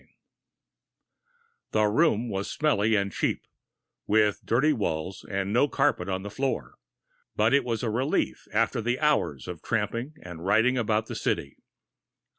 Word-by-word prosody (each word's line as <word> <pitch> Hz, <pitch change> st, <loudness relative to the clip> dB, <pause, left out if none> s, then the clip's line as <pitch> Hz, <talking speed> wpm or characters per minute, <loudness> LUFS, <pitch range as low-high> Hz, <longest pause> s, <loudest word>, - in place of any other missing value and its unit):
II -, -, -28 dB, 1.7 s
The 110 Hz, 0 st, +3 dB
room 120 Hz, +1 st, +2 dB
was 100 Hz, -2 st, -3 dB
smelly 110 Hz, -8 st, +2 dB
and 100 Hz, -2 st, 0 dB
cheap, -, -, -1 dB, 0.6 s
with 105 Hz, -1 st, +2 dB
dirty 140 Hz, +7 st, +3 dB
walls 90 Hz, -, -3 dB
and 100 Hz, +1 st, -2 dB
no 125 Hz, +5 st, +4 dB
carpet 115 Hz, -, +1 dB
on 95 Hz, 0 st, -2 dB
the 105 Hz, -, -6 dB
floor, 115 Hz, -, -3 dB, 0.6 s
but 110 Hz, +4 st, +3 dB
it 140 Hz, -, +4 dB
was 115 Hz, -1 st, -2 dB
a 115 Hz, -, 0 dB
relief 130 Hz, +6 st, -1 dB
after -, -, +1 dB
the 120 Hz, +3 st, -1 dB
hours 145 Hz, -, +1 dB
of 90 Hz, -4 st, -6 dB
tramping 115 Hz, +6 st, -2 dB
and 85 Hz, -2 st, -9 dB
riding 110 Hz, +7 st, +3 dB
about 110 Hz, -2 st, +1 dB
the -, -, -7 dB
city. 70 Hz, -, -2 dB
110 Hz, 150 wpm, -27 LUFS, 100-125 Hz, 1.7 s, no